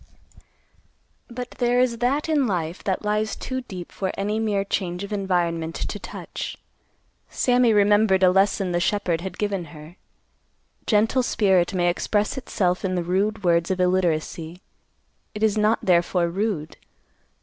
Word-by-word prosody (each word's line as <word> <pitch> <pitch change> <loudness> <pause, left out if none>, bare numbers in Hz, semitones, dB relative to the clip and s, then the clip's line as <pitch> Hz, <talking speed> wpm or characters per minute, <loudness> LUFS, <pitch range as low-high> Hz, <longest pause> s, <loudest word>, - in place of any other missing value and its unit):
But 245 +1 -6
there 245 0 +2
is 245 -2 +1
that 275 +6 0
in 295 -5 +2
life 175 -3 -3
that 195 +1 -1
lies 210 +1 0
too 260 0 -4
deep 185 -8 -9
for 190 -1 -3
any 210 +2 -1
mere 210 -3 0
change 180 -2 -3
of 200 +1 -6
environment 170 -4 -1
to - - -4
touch. - - -7 0.7
Sammy 245 -2 +3
remembered 205 -2 +4
a 180 - +6
lesson 195 0 +2
the 175 - +1
shepherd 175 -3 0
had 190 +1 -6
given 200 -4 -2
her: 155 +3 -13 0.9
gentle 225 +4 +3
spirit 190 -6 +2
may 175 -1 +2
express 205 +6 0
itself 185 -8 -1
in 185 -1 -1
the 175 - -1
rude 200 +4 0
words 170 -1 +2
of 190 -1 -1
illiteracy; 175 -2 -1 0.7
it 210 - -3
is 215 -1 +3
not 215 +1 +3
therefore 175 -1 +2
rude. 185 -4 -3
195 Hz, 150 wpm, -23 LUFS, 175-215 Hz, 0.9 s, a